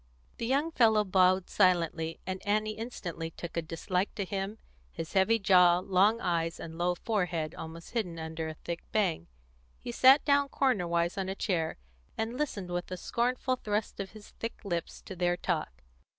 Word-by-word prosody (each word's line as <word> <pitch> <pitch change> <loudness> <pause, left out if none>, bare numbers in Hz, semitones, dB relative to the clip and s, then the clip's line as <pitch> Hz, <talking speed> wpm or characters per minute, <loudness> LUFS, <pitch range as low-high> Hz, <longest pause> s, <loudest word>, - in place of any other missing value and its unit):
The 230 - -2
young 285 +6 +1
fellow 220 -7 +4
bowed 185 -1 +3
silently, 165 -4 +2
and 185 0 -4
Annie 215 +1 +1
instantly 175 -8 -5
took 170 +1 -8
a 170 - +1
dislike 180 +4 -2
to 200 - -2
him, 195 +3 -3 0.3
his 160 - -6
heavy 195 +4 +4
jaw, 180 -4 +6
long 195 +4 +3
eyes, 165 -4 -1
and 160 0 -7
low 175 +1 +1
forehead 175 -6 -1
almost 165 +1 -9
hidden 195 -8 -2
under 160 0 -4
a 155 - -6
thick 170 +2 -6
bang. 185 - 0 0.5
He - - -6
sat 265 - +6
down 285 -1 +3
cornerwise 175 -10 +1
on 190 0 -2
a 190 - -3
chair, 170 -6 -1 0.4
and 225 +2 -2
listened, 210 -11 -3
with 175 0 -3
a 185 - -4
scornful 250 +6 0
thrust 210 -2 -2
of 195 0 -5
his 215 -1 -12
thick 230 - -5
lips, 170 -4 -3
to 190 - -8
their 175 0 +1
talk. 155 - -3
185 Hz, 175 wpm, -30 LUFS, 170-215 Hz, 0.5 s, jaw